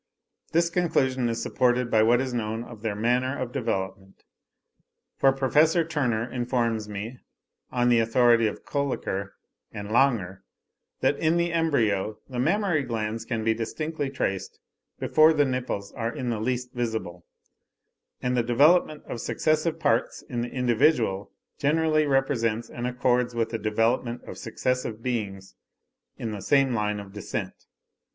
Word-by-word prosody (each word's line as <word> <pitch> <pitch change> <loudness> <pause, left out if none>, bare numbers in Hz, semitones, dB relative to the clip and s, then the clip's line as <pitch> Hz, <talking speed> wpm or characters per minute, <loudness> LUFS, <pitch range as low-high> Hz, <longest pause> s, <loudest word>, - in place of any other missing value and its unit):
This 170 +1 +2
conclusion 130 -8 +1
is 115 0 -2
supported 125 -1 +1
by 110 - +5
what 120 +3 +4
is 130 -1 -3
known 110 -1 -2
of 115 -3 -11
their 110 -2 -2
manner 125 +5 +1
of 125 -2 -4
development; 95 -6 -4 1.0
for 135 - +5
Professor 150 +5 +3
Turner 125 -8 -1
informs 120 -3 -1
me, 105 +5 -6 0.5
on 125 0 +2
the 120 -1 +5
authority 115 0 +4
of 105 - -6
Kolliker 125 -9 -2 0.4
and 100 0 -7
Langer, 110 -7 +2 0.6
that - - +2
in 160 +1 +2
the 170 0 0
embryo 110 -11 +1
the 125 -2 -5
mammary 175 +3 +2
glands 115 -3 -3
can 115 -2 -2
be 110 0 +3
distinctly 145 +6 -3
traced 95 -8 -3 0.4
before 155 +1 +5
the 145 -2 +3
nipples 125 -6 -3
are 115 -2 -3
in 125 0 -3
the 115 - -2
least 125 +2 -2
visible; 110 -8 -4 1.0
and 125 0 +1
the 120 - +3
development 150 +6 +3
of 115 - -5
successive 155 +1 0
parts 115 +3 0
in 120 -2 -4
the 120 - -3
individual 120 -5 +1 0.3
generally 155 +1 +2
represents 120 -5 0
and 120 +1 -3
accords 125 -1 +1
with 115 -1 0
the 115 - -2
development 115 +3 0
of - - -9
successive 115 -1 -2
beings 95 -6 -3 0.6
in 115 - -4
the 105 -2 -5
same 135 +1 +3
line 105 -2 -1
of 100 -1 -10
descent. 105 -3 -4
120 Hz, 145 wpm, -26 LUFS, 110-135 Hz, 1.0 s, by